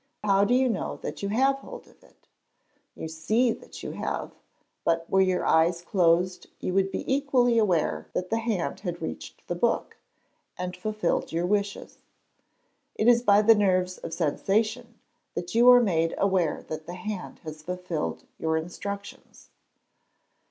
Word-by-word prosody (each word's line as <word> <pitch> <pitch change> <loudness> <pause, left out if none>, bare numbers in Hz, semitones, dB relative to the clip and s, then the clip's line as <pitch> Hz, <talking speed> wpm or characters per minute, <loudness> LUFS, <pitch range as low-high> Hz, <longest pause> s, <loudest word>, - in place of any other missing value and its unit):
How 200 -1 +4
do 245 +4 +3
you 260 0 +3
know 235 - -2
that - - -5
you 200 - -2
have 265 +6 +2
hold - - -10
of - - -23
it? - - -25 0.7
You - - -6
see 215 +10 +1
that - - -9
you - - -4
have: - - -4 0.5
but 165 0 0
were 190 - +3
your 185 -1 +1
eyes 170 +2 +3
closed, 180 0 +2
you 185 - -3
would 195 0 +2
be - - -3
equally 260 -4 +2
aware 160 - +1
that 180 0 -3
the 225 - +2
hand 225 -6 -2
had 175 -3 -4
reached 80 - -7
the - - -1
book, - - -1 0.6
and 180 0 -4
fulfilled 210 -1 -1
your 170 +2 0
wishes. 200 +1 -2 1.0
It 215 - +1
is 240 -1 +6
by 210 -3 +5
the 225 +2 +8
nerves 185 -3 +1
of - - -7
sensation 215 - -1 0.4
that 175 0 -4
you 240 +2 +6
are 245 0 +9
made 165 -8 +1
aware 190 -5 +1
that 155 0 -7
the 175 - -6
hand 185 +1 -6
has 155 -1 -8
fulfilled 180 -1 -4 0.2
your 160 0 0
instructions. 200 +5 -7
190 Hz, 160 wpm, -27 LUFS, 170-220 Hz, 1.0 s, are